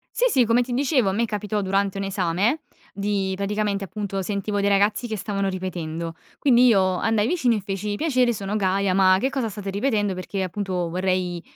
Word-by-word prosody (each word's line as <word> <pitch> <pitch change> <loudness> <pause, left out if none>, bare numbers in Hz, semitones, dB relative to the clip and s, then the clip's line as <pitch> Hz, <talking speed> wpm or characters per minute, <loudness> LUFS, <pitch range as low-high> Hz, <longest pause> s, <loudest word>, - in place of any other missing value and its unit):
Sì, - - +2
sì, 255 - +3
come 230 +2 +3
ti 245 0 -5
dicevo, 260 -4 +2
a - - +1
me 230 +4 +1
capitò 210 -1 -2
durante 195 0 0
un 195 - -2
esame 195 - 0 0.3
di 200 -1 -1
praticamente, 200 0 -1
appunto 195 0 -4
sentivo 200 +1 -2
dei 200 - +1
ragazzi 205 +4 +2
che 220 - -3
stavano 200 -1 -2
ripetendo, 170 -3 -4 0.2
quindi 250 -3 +5
io 190 -5 +3
andai 220 +1 +1
vicino 255 -10 +2
e 210 - -2
feci: 200 +1 -3
“Piacere, 255 -3 +2
sono 200 0 -4
Gaia, 195 -1 +1
ma 185 -1 +5
che 265 - +1
cosa 260 -4 -2
state 200 -1 -6
ripetendo? 205 -2 0
Perché 185 +2 -4
appunto 185 -2 -2
vorrei, 180 0 -1
200 Hz, 190 wpm, -23 LUFS, 190-220 Hz, 0.3 s, quindi